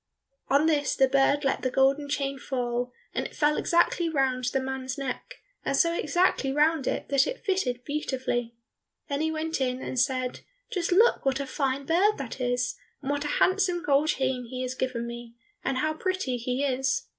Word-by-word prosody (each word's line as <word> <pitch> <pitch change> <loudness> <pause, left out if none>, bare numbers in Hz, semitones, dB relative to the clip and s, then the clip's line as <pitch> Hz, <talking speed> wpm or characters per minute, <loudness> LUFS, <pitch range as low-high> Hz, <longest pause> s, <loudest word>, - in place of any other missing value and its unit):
On 280 +3 +3
this 295 -3 +2
the 265 - +4
bird 275 +2 +3
let 270 - +1
the 255 - 0
golden 275 +3 +2
chain 275 -1 -1
fall, 245 -2 -2 0.2
and - - -1
it - - -7
fell 300 0 +3
exactly 340 0 +2
round 265 -4 0
the 260 +2 +1
man's 265 +1 -4
neck, 270 -2 -5 0.3
and 275 - 0
so 335 +3 +3
exactly 340 -4 +1
round 300 0 +2
it - - -2
that 275 -1 +3
it - - -5
fitted 255 - 0
beautifully. 255 -5 -2 0.5
Then 280 +1 -1
he 320 - +1
went 320 -1 -2
in 250 -1 0
and 260 - -3
said, 255 -1 0 0.3
"Just 355 -2 -1
look 435 +7 +4
what 270 0 +1
a 280 - -2
fine 275 0 -1
bird 380 +7 +3
that 265 -1 -6
is, 245 0 0 0.3
and 275 - -1
what 285 0 -1
a 295 - -1
handsome 370 -2 +2
gold 290 -2 +3
chain 260 -4 0
he 255 +1 -4
has 255 0 -3
given 255 -2 -2
me, 235 0 -8 0.3
and 265 0 -1
how 310 +3 +1
pretty 370 -7 -1
he 250 +3 -2
is!" 270 - 0
275 Hz, 190 wpm, -27 LUFS, 255-310 Hz, 0.5 s, the